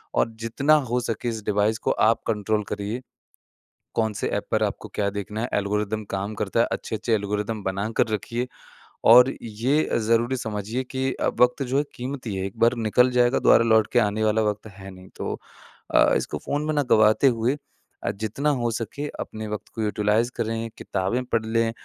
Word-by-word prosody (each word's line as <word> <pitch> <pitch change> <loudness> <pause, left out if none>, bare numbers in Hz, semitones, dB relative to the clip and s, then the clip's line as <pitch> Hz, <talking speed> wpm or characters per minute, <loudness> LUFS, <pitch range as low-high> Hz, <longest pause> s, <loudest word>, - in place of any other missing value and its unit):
और - - +2 0.2
जितना 140 +6 +2 0.2
हो 125 +1 +1
सके 120 0 -2
इस 110 -2 -5
डिवाइस 105 +1 +1
को - - +5 0.2
आप 115 - +2
कंट्रोल 105 -1 0
करिए। 105 +4 -4 0.9
कौन-से 110 -2 0
ऐप - - -4
पर - - +2
आपको - - -3
क्या 100 -1 +1
देखना 105 +2 -4
है 120 - -2
एल्गोरिदम 105 +1 -1
काम 100 +2 -2
करता 105 +2 -1
है - - +5
अच्छे-अच्छे 115 +1 -2
एल्गोरिदम 105 +1 -1
बना 95 +3 -2
कर - - +4
रखिए। 120 +4 -2 0.7
और 125 +2 +7
ये 120 +8 0
ज़रूरी 115 +3 +2
समझिए 110 +3 -3
कि 130 +1 -2
अ, - - -1
वक़्त 125 +2 +4
जो 130 +1 -1
है 145 - +3
कीमती 125 -4 -5
है 95 - -2
एक 95 - -12
बार 115 +2 +4
निकल 125 +4 +4
जाएगा 120 +1 +4
दोबारा 115 - +5
लौट 110 -2 +4
के 120 - +5
आने 105 0 +1
वाला 110 +1 +2
वक़्त 105 +1 -2
है 95 0 -9
नहीं। 95 0 -13
तो - - -4 0.6
अ, - - +6
इसको - - -3
फ़ोन 145 +1 -1
में 155 - 0
ना 145 -1 +2
गँवाते 110 +4 +5
हुए 120 +5 +1 0.5
अ, 100 - 0
जितना 110 +8 -2
हो 120 -1 0
सके 115 +6 -4
अपने 110 0 -6
वक़्त 105 - -5
को 115 - -3
यूटिलाइज़ 105 +3 +1
करें, 115 0 -2
किताबें 100 +7 -1
पढ़ 115 -2 -1
लें 115 0 +1
110 Hz, 190 wpm, -24 LUFS, 105-120 Hz, 0.9 s, और